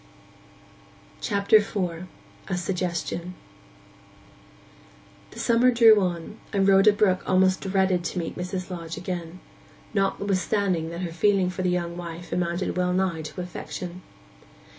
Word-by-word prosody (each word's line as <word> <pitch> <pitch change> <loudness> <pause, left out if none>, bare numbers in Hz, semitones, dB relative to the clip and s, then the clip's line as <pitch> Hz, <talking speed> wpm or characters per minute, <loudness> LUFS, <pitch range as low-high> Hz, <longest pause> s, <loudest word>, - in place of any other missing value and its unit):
CHAPTER 200 0 +4
IV—A 185 -2 -4
SUGGESTION 180 -1 -3 1.9
The - - -11
summer 240 +1 +4
drew 225 -3 +6
on, 175 +2 -3
and 195 -2 +2
Rhoda 195 +2 +6
Brook 200 -2 +2
almost 185 0 +3
dreaded 190 -2 +1
to 175 - -3
meet 170 -2 -3
Mrs. 180 +1 -5
Lodge 165 -2 -6
again, 175 0 -5 0.5
notwithstanding 195 -3 0
that 170 +1 -6
her 170 -3 -4
feeling 190 +1 +2
for 185 - -5
the 185 - +1
young 175 -1 -2
wife 170 0 -8
amounted 175 +1 -1
well 180 0 +1
nigh 185 -3 0
to 155 +4 -6
affection. 180 0 -7
185 Hz, 120 wpm, -25 LUFS, 175-195 Hz, 1.9 s, drew